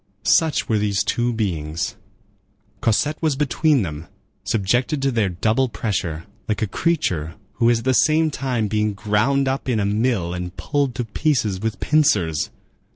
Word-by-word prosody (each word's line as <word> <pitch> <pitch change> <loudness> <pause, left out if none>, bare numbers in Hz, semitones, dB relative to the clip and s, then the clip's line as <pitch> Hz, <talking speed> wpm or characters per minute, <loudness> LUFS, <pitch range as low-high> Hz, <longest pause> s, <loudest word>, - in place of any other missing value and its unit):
Such 160 +4 +3
were 110 -2 +1
these 100 -1 +1
two 120 +2 0
beings. 85 -8 -2 0.9
Cosette 145 +7 +1
was 155 -4 +1
between 150 -1 +2
them, 80 -1 -6 0.4
subjected 120 +8 0
to 135 - +2
their 110 -5 +1
double 110 +8 +1
pressure, 90 -8 -3 0.2
like 105 0 0
a - - 0
creature 90 - -1 0.2
who 120 -1 +4
is 120 - +4
at - - -13
the 130 - +3
same 155 +4 +3
time 125 -6 -1
being 105 0 0
ground 105 +7 +1
up 135 0 -2
in 115 -3 +1
a 100 - +1
mill 105 -4 0
and 90 +1 -6
pulled 140 -4 -1
to 125 -2 -2
pieces 110 -5 0
with 110 -1 -2
pincers. 100 - +2
110 Hz, 160 wpm, -21 LUFS, 100-135 Hz, 0.9 s, who